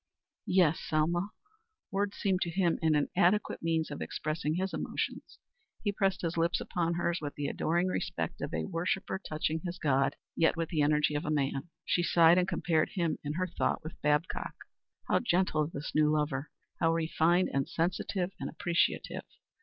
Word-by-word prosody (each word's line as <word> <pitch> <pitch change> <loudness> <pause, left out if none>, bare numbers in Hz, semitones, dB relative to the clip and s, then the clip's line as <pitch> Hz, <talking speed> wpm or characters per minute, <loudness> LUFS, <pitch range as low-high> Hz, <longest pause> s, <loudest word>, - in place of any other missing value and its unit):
"Yes, 175 -4 +4
Selma." 170 +5 0 0.6
Words 200 0 -1
seemed 190 -2 +1
to 175 - 0
him 175 -1 +1
an 160 -2 +3
inadequate 180 +7 +2
means 165 -1 0
for - - -6
expressing 155 0 -2
his 190 +2 -1
emotions. - - -4 0.5
He 205 - +1
pressed 195 -2 0
his 170 0 -1
lips 170 +1 +2
upon 170 -1 -1
hers 170 0 0
with 145 -1 -5
the 145 - -3
adoring 170 +5 +1
respect 185 - -3
of - - -3
a - - -2
worshipper 185 +2 -2
touching 155 +1 -1
his 180 -1 -4
god, 135 -3 +2 0.2
yet 165 +1 +3
with 165 -1 -1
the 155 -3 +1
energy 150 +1 +3
of 145 - -1
a - - -3
man. 140 +1 -1 0.2
She 175 - +2
sighed 170 0 +6
and 180 - +1
compared 160 -4 +1
him 170 -4 0
in 145 0 -2
her 185 +3 0
thought 180 - -1
with 160 - -9
Babcock. 150 +3 0 0.5
How - - +3
gentle 175 -8 +1
this 150 -2 -6
new 155 0 +4
lover! 150 -2 0 0.3
How 165 - +3
refined 165 +2 +2
and 135 -1 0
sensitive 180 +2 -1
and - - -3
appreciative! 170 -1 0
165 Hz, 175 wpm, -31 LUFS, 155-180 Hz, 0.6 s, sighed